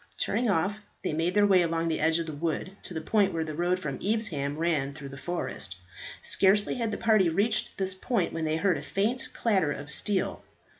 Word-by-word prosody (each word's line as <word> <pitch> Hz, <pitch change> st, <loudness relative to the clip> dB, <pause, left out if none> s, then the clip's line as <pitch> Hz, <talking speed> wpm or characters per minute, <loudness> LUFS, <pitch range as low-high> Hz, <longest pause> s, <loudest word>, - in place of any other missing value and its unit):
Turning 240 Hz, -1 st, +1 dB
off, 195 Hz, +3 st, +1 dB, 0.2 s
they -, -, -1 dB
made 165 Hz, +4 st, 0 dB
their 205 Hz, 0 st, +5 dB
way 190 Hz, -3 st, +5 dB
along 165 Hz, -1 st, 0 dB
the 160 Hz, -, 0 dB
edge 160 Hz, +1 st, +3 dB
of 170 Hz, -, -2 dB
the 160 Hz, -, -5 dB
wood 165 Hz, +5 st, -3 dB
to -, -, -6 dB
the -, -, -1 dB
point 200 Hz, +3 st, +2 dB
where 165 Hz, -2 st, -1 dB
the 155 Hz, -1 st, -5 dB
road 175 Hz, +3 st, +1 dB
from 150 Hz, -8 st, -4 dB
Evesham 185 Hz, -10 st, -1 dB
ran 155 Hz, -4 st, 0 dB
through 140 Hz, -1 st, -8 dB
the 135 Hz, -, -9 dB
forest. 135 Hz, -, -3 dB, 0.5 s
Scarcely 200 Hz, +2 st, +3 dB
had 230 Hz, -3 st, -1 dB
the 215 Hz, -, -3 dB
party 215 Hz, -6 st, +4 dB
reached 210 Hz, +6 st, 0 dB
this 190 Hz, -1 st, -1 dB
point 195 Hz, 0 st, -1 dB
when 165 Hz, -, -2 dB
they 155 Hz, 0 st, +1 dB
heard 180 Hz, +1 st, +2 dB
a -, -, -7 dB
faint 220 Hz, +6 st, -1 dB
clatter 190 Hz, -10 st, +1 dB
of 145 Hz, +1 st, -4 dB
steel. 195 Hz, +5 st, 0 dB
175 Hz, 215 wpm, -28 LUFS, 160-205 Hz, 0.5 s, their